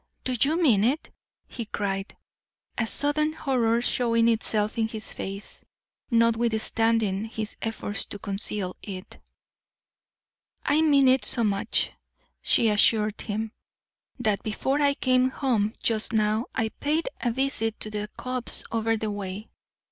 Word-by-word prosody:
"Do 255 - -1
you 310 +5 +3
mean 235 - +4
it?" 270 +7 0 0.4
he 235 - -6
cried, 195 -2 -4 0.6
a 230 - -1
sudden 300 +5 +1
horror 240 -6 +1
showing 230 -2 +2
itself 215 -1 0
in 220 - +2
his 220 -1 -5
face, 195 +1 -7 0.5
notwithstanding 225 -2 +1
his 220 -1 -5
efforts 220 -2 +1
to - - -5
conceal 195 -1 +1
it. 190 -2 -8 1.5
"I 300 +2 +3
mean 285 -4 +4
it 255 -2 +4
so 235 +2 +1
much," 200 -2 0 0.5
she 230 - +3
assured 210 0 +3
him, 220 0 -3 0.7
"that 215 -4 0
before 265 +6 -1
I 280 -1 +3
came 255 -1 +2
home 235 -6 0
just 220 0 +2
now 215 +1 +1
I 225 -1 0
paid 305 - -2
a 245 - +1
visit 230 -3 -1
to 215 - -3
the 210 0 -3
copse 255 -1 +3
over 225 0 0
the 215 -1 -3
way. 200 +1 -6
225 Hz, 135 wpm, -26 LUFS, 210-255 Hz, 1.5 s, mean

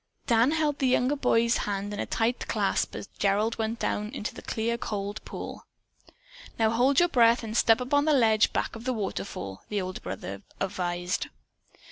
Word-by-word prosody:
Dan 235 +1 +4
held 305 -2 0
the 265 - +2
younger 255 +2 +2
boy's 235 -4 +2
hand 205 0 -3
in 205 - -5
a - - -2
tight 230 +2 0
clasp - - 0
as - - -5
Gerald 210 +3 +1
went 225 +1 -1
down 210 -2 -1
into 215 - -4
the - - -9
clear, 230 +1 -1
cold 205 -3 -4
pool. - - -7 0.9
"Now, 220 -1 +3
hold 255 +4 +3
your 350 - +5
breath 235 -6 +4
and 220 0 -5
step 225 0 +5
up 250 +2 -4
on 285 0 +4
that 305 -2 +4
ledge 220 -4 +4
back - - -2
of 230 +1 -9
the 255 - +1
waterfall," 195 - -4
the 210 - -1
older 185 -1 -5
brother 95 0 -6 0.2
advised. 180 -1 -2
225 Hz, 185 wpm, -27 LUFS, 205-250 Hz, 0.9 s, your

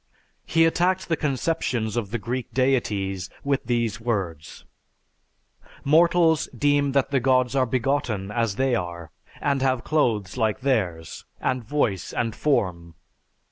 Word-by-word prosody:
He 165 0 +4
attacked 180 +3 +1
the 165 - +2
conceptions 130 -6 -1
of 115 -5 -2
the 120 - -2
Greek 120 +2 -4
deities 100 -8 0
with 140 -2 0
these 115 -2 -1
words, 90 -10 -4 1.2
"Mortals 165 +1 +4
deem 145 -1 +2
that 140 0 +1
the 135 - +3
gods 130 0 +2
are 130 -2 +2
begotten 120 -5 -1
as 115 -3 0
they 135 +1 +1
are, 85 -6 -4 0.3
and 140 -2 0
have 130 -2 +1
clothes 110 -10 0
like 110 0 0
theirs, 90 - -1
and 130 -2 -1
voice 110 -7 -1
and 115 -2 -1
form 90 - -1
125 Hz, 135 wpm, -24 LUFS, 105-140 Hz, 1.2 s, He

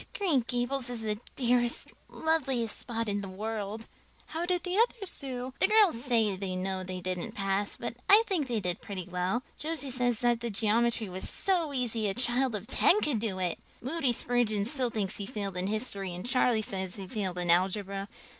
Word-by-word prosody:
Green 345 -9 +3
Gables 245 +1 -1
is 240 -2 -4
the 210 -1 -2 0.2
dearest, 240 -1 +1 0.2
loveliest 270 -8 0
spot 230 -2 -3
in 205 0 -1
the 195 - -6
world." 215 +2 -4 0.4
"How 335 +2 -3
did 360 -1 0
the 360 0 -2
others 450 -5 +1
do?" 255 -1 -5
"The - - +6
girls 400 - +5
say 225 -6 +2
they 185 -1 -4
know 185 0 -2
they 185 0 -5
didn't 180 -1 -2
pass, 195 0 0
but 240 - -4 0.2
I 420 +3 +9
think 350 -10 0
they 235 -3 0
did 180 -1 -2
pretty 190 -4 -6
well. 185 +7 -1 0.2
Josie 300 -3 -2
says 245 -2 +1
the 235 -1 +1
geometry 225 +1 +2
was 185 0 -5
so 350 -6 0
easy 235 -5 -1
a 195 - -2
child 250 0 +1
of 205 0 -4
ten 345 - +4
could 280 -7 +1
do 205 -4 -2
it! 180 -2 -1 0.2
Moody 270 0 0
Spurgeon 230 -4 +1
still 255 0 -1
thinks 210 -4 -2
he 200 - -5
failed 200 -6 -4
in 180 +1 -1
history 200 -4 -2
and 180 - -6
Charlie 245 -3 +2
says 190 -2 -3
he 195 - -6
failed 185 -2 -3
in 175 -1 +4
algebra. 195 +2 +2
225 Hz, 190 wpm, -30 LUFS, 195-255 Hz, 0.4 s, I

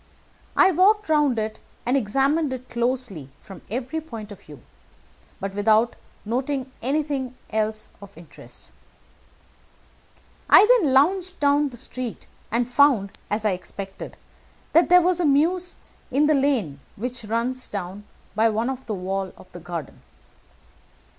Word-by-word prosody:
I 380 - +6
walked 405 +3 +3
round 295 -5 +3
it 215 0 -3 0.3
and 245 +3 +2
examined 275 +5 +1
it 255 -1 -7
closely 235 - -2
from 195 -3 -12
every 255 +8 -3
point 225 -9 -9
of 205 - -11
view, 150 -3 -14 0.8
but 195 0 -4
without 215 +3 +3 0.3
noting 260 +3 -2
anything 275 -1 -1 0.2
else 215 0 -2
of 200 -3 -13
interest. 165 -1 -13 1.8
"I - - +9
then 435 - +4
lounged 365 +7 +2
down 285 0 +3
the 245 - -11
street, 245 0 -6 0.2
and 235 +1 0
found, 250 -6 +3 0.2
as 215 +1 -2
I 210 - +3
expected, 195 +1 -7 0.6
that 335 +2 +5
there 360 0 +7
was 360 0 +2
a - - +1
mews 340 +6 +2 0.3
in 285 +3 +2
a 310 - +4
lane 260 - +1 0.2
which 240 +1 -5
runs 235 +4 -2
down 195 0 -5 0.3
by 220 +2 +3
one 230 +5 -1
wall 195 -2 -3
of - - -16
the 175 - -9
garden. 170 -4 -7
250 Hz, 135 wpm, -24 LUFS, 210-290 Hz, 1.8 s, I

